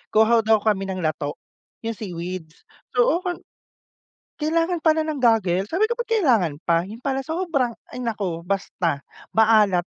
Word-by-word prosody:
Kuha 225 Hz, +2 st, +5 dB
daw 220 Hz, -1 st, +3 dB
kami 195 Hz, -3 st, +1 dB
ng 185 Hz, -2 st, -4 dB
lato, 150 Hz, -2 st, -2 dB, 0.5 s
yung 230 Hz, -, -1 dB
seaweeds, 175 Hz, -4 st, -7 dB, 0.3 s
so 245 Hz, -, +4 dB
oken 360 Hz, -1 st, -4 dB, 0.9 s
kailangan 330 Hz, +2 st, 0 dB
pala 315 Hz, -1 st, +4 dB
ng 295 Hz, -4 st, -3 dB
goggles. 200 Hz, -5 st, +2 dB
Sabi 390 Hz, +6 st, +3 dB
ko, 475 Hz, -, -1 dB
"Ba't 480 Hz, 0 st, -5 dB
kailangan 240 Hz, -, +3 dB
pa?" 170 Hz, -1 st, +1 dB
yun 215 Hz, +5 st, -9 dB
pala 270 Hz, 0 st, 0 dB
sobrang 320 Hz, -6 st, -1 dB, 0.2 s
ay, 250 Hz, -, -5 dB
naku, 195 Hz, -7 st, -2 dB
basta 180 Hz, -5 st, -1 dB, 0.3 s
maalat! 215 Hz, -5 st, +4 dB
220 Hz, 150 wpm, -23 LUFS, 185-300 Hz, 0.9 s, Kuha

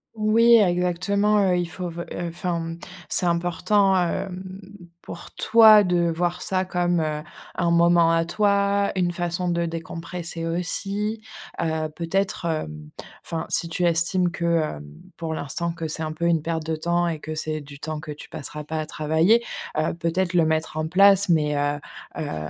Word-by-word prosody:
Oui, 225 Hz, +2 st, +5 dB
exactement, 200 Hz, +2 st, +2 dB
heu, 180 Hz, -1 st, +2 dB
il 175 Hz, -1 st, -1 dB
faut 175 Hz, 0 st, -5 dB
f 170 Hz, -, -9 dB
heu, -, -, -4 dB, 0.2 s
enfin, 170 Hz, 0 st, -3 dB
mmh. 165 Hz, 0 st, -6 dB, 0.3 s
C'est 185 Hz, -, +2 dB
important, 180 Hz, +3 st, +2 dB
hem, 180 Hz, +1 st, -1 dB, 0.6 s
pour 170 Hz, -, -9 dB
toi 220 Hz, -2 st, +7 dB
de 175 Hz, -2 st, +1 dB
voir 175 Hz, +1 st, -1 dB
ça 185 Hz, 0 st, 0 dB
comme, 175 Hz, -2 st, 0 dB
heu, 155 Hz, -1 st, -2 dB, 0.3 s
un 170 Hz, -1 st, +1 dB
moment 170 Hz, 0 st, +4 dB
à 165 Hz, 0 st, +2 dB
toi, 200 Hz, +1 st, +1 dB
une 180 Hz, -2 st, +1 dB
façon 175 Hz, +1 st, -2 dB
de 170 Hz, 0 st, 0 dB
décompresser 165 Hz, 0 st, -6 dB
aussi, 200 Hz, +5 st, -2 dB, 0.4 s
heu, 160 Hz, -1 st, -1 dB
peut-être, 185 Hz, +2 st, -2 dB
hem, 75 Hz, -, -4 dB, 0.3 s
enfin, 165 Hz, -1 st, -4 dB
si 170 Hz, -, +1 dB
tu 170 Hz, +2 st, -2 dB
estimes 175 Hz, +2 st, +2 dB
que, 170 Hz, -, -4 dB, 0.3 s
hem, 75 Hz, -, -10 dB, 0.3 s
pour 165 Hz, -1 st, -4 dB
l'instant 170 Hz, +5 st, -3 dB
que 165 Hz, -1 st, -5 dB
c'est 155 Hz, -, -4 dB
un 155 Hz, -, -3 dB
peu 170 Hz, +2 st, -3 dB
une 170 Hz, -2 st, +2 dB
perte 160 Hz, 0 st, -3 dB
de 160 Hz, 0 st, -1 dB
temps 170 Hz, +2 st, 0 dB
et 165 Hz, -2 st, -3 dB
que 155 Hz, +1 st, -6 dB
c'est 155 Hz, 0 st, -3 dB
du 140 Hz, 0 st, -12 dB
temps 155 Hz, 0 st, -4 dB
que 150 Hz, -, -8 dB
tu 150 Hz, -, -10 dB
passeras 150 Hz, +2 st, -7 dB
pas 155 Hz, +1 st, -4 dB
à 155 Hz, -, -2 dB
travailler, 160 Hz, +11 st, +2 dB, 0.3 s
heu, 155 Hz, +1 st, 0 dB
peut-être 170 Hz, +2 st, -1 dB
le 170 Hz, -2 st, +4 dB
mettre 160 Hz, 0 st, -1 dB
en 155 Hz, 0 st, -1 dB
place 195 Hz, +2 st, +5 dB
mais 150 Hz, -3 st, +2 dB
heu 145 Hz, 0 st, 0 dB, 0.4 s
heu 75 Hz, -1 st, -4 dB
170 Hz, 180 wpm, -24 LUFS, 160-185 Hz, 0.6 s, toi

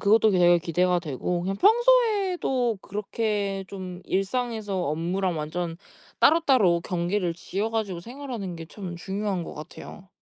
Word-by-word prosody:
그것도 220 Hz, +1 st, +5 dB
되게 175 Hz, -2 st, +5 dB
기대가 180 Hz, +2 st, +1 dB
되고. 165 Hz, +3 st, -2 dB
그냥 195 Hz, +2 st, -2 dB
평소에도 400 Hz, -, +3 dB
그렇게 205 Hz, -1 st, -2 dB
좀 185 Hz, -2 st, -7 dB
일상에서 210 Hz, 0 st, -1 dB
업무랑 175 Hz, +4 st, -1 dB
완전 165 Hz, +2 st, -3 dB, 0.4 s
따로따로 255 Hz, -, +5 dB
경계를 175 Hz, 0 st, -1 dB
지어 195 Hz, +6 st, -3 dB
가지고 210 Hz, -6 st, -2 dB
생활하는 235 Hz, -4 st, -6 dB
게 165 Hz, -1 st, -8 dB
참 180 Hz, -1 st, -7 dB
중요한 190 Hz, +1 st, -3 dB
것 -, -, -7 dB
같아요. 180 Hz, +5 st, -10 dB
195 Hz, 315 characters per minute, -26 LUFS, 175-225 Hz, 0.4 s, 그것도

